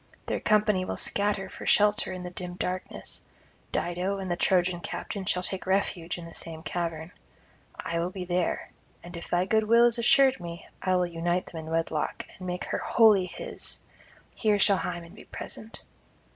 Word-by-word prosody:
Their - - -1
company 210 -3 +3
will - - -3
scatter 200 -1 +2
for - - -9
shelter 210 +2 +5
in 185 -1 -5
the 180 - -6
dim 180 0 -5
darkness; 185 0 -4 0.5
Dido 180 +3 -1
and 190 -2 -4
the - - +2
Trojan 180 -1 +2
captain 200 - -5
[125 180 -1 0
159]shall - - +4
take 190 - -5
refuge 190 -3 0
in 170 - -8
the 165 - -10
same 160 -1 -6
cavern. 165 -2 -3 0.7
I 170 0 -2
will 170 +1 0
be 185 0 -5
there, 175 0 -1 0.3
and 175 +1 -9
if 170 - -7
thy 175 +1 +2
goodwill 220 +3 +5
is 240 0 +3
assured 265 +2 +5
me, 170 -1 -8
I 185 -1 +2
will 180 0 +3
unite 175 +1 -1
them 165 - -8
in - - -6
wedlock, 165 -2 -1
and 185 - -6
make 180 0 -3
her - - -2
wholly 210 -5 +5
his; - - -4 0.6
here 215 -2 +2
shall 200 0 +4
Hymen 170 -1 -4
be - - -13
present.' 220 +1 -8
180 Hz, 185 wpm, -28 LUFS, 175-205 Hz, 0.7 s, shelter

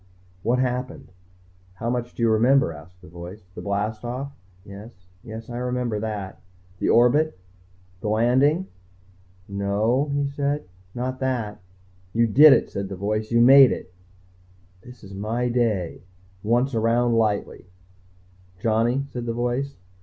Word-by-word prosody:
"What 120 +5 +1
happened?" 125 0 -3 0.6
"How 110 - -5
much 120 -1 -3
do 115 - -3
you 115 - +4
remember?" 120 -3 +3
asked 90 +4 -15
the - - -12
voice. 90 +4 -10
"The - - -8
blast 105 +2 -2
off?" 130 +4 -5 0.3
"Yes 100 +3 -10 0.3
yes, 110 -1 -8
I 120 - -6
remember 125 -3 -2
that." 105 -3 -5 0.4
"The - - 0
orbit? 135 +4 +4 0.6
The 105 - -5
landing?" 130 - +3 0.8
"No," 105 +8 0
he 140 0 0
said. 140 +1 -2 0.3
"Not 130 +1 -3
that." 120 -6 -2 0.5
"You 115 +1 +3
did 145 +7 +8
it," - - +3
said 100 -1 -4
the 95 - -5
voice. 105 +3 -2
"You 115 0 +4
made 135 +1 +8
it." 90 - -6 0.9
This 125 +4 -14
is 100 0 -11
my 115 +5 -2
day. 110 -8 -1 0.4
Once 120 +6 +1
around 115 +1 +2
lightly. 105 -4 -1 0.9
"Johnny," 115 +6 +1
said 120 -1 -5
the 115 - -1
voice. 125 +4 -2
115 Hz, 140 wpm, -24 LUFS, 105-125 Hz, 0.9 s, did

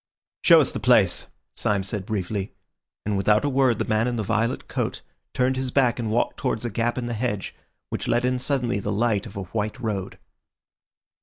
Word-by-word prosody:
"Show - - +7
us - - +1
the - - -4
place," - - +4 0.3
Syme 100 -2 0
said 95 0 -4
briefly, 100 -1 -3 0.5
and 105 -1 0
without 105 +5 +3
a - - +2
word 130 -4 +3
the - - -1
man 110 +2 +1
in 125 - -1
the 110 - -1
violet 115 +4 -1
coat - - -3 0.3
turned 130 +1 +2
his 130 0 -1
back 125 -2 +2
and 115 -2 -2
walked 115 +3 0
towards 110 - -2
a 120 - -2
gap 115 +4 0
in 125 - -2
the 120 - -3
hedge, 110 -3 -2 0.4
which - - -3
let 120 +1 +2
in 125 0 +1
suddenly 125 -4 0
the 105 +1 -3
light 110 0 +1
of 100 -1 -10
a 100 - -3
white 105 +3 -3
road. 100 -5 -3
115 Hz, 205 wpm, -24 LUFS, 105-125 Hz, 0.5 s, Show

